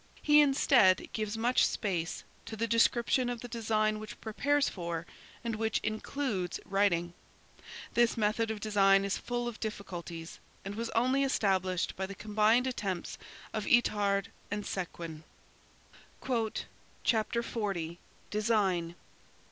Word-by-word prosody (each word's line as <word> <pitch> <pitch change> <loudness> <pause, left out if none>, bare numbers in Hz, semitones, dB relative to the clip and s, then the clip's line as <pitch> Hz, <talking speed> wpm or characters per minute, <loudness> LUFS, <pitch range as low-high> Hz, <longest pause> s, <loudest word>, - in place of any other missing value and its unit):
He 300 0 +7
instead, 270 -8 +4
gives 215 0 -2
much 240 +3 +3
space 175 -5 -1 0.2
to 220 - -5
the 225 +1 0
description 235 +2 +3
of 240 -2 -4
the 245 - -6
design 215 -2 0
which 215 0 -9
prepares 280 +6 +1
for, 170 -2 -4 0.4
and 230 -2 -2
which 220 0 0
includes 215 -4 -2
writing. 175 -4 +1 0.8
This 235 -1 +3
method 220 +1 +1
of 220 -1 -3
design 195 -2 +4
is 200 - -1
full 240 0 -3
of 240 - -6
difficulties 175 -6 -6 0.3
and 200 - -4
was 230 +2 -3
only 255 +4 +3
established 190 -8 +1
by 190 0 -3
the 195 - -8
combined 215 +4 +3
attempts 200 -8 -3 0.3
of 215 -2 -2
Itard 205 -4 +3 0.2
and 205 0 -3
Séguin. 170 -5 -5 1.8
"Chapter 235 +1 +1
XL: 195 -9 -2 0.4
DESIGN. 200 -6 +1
215 Hz, 125 wpm, -31 LUFS, 195-235 Hz, 1.8 s, He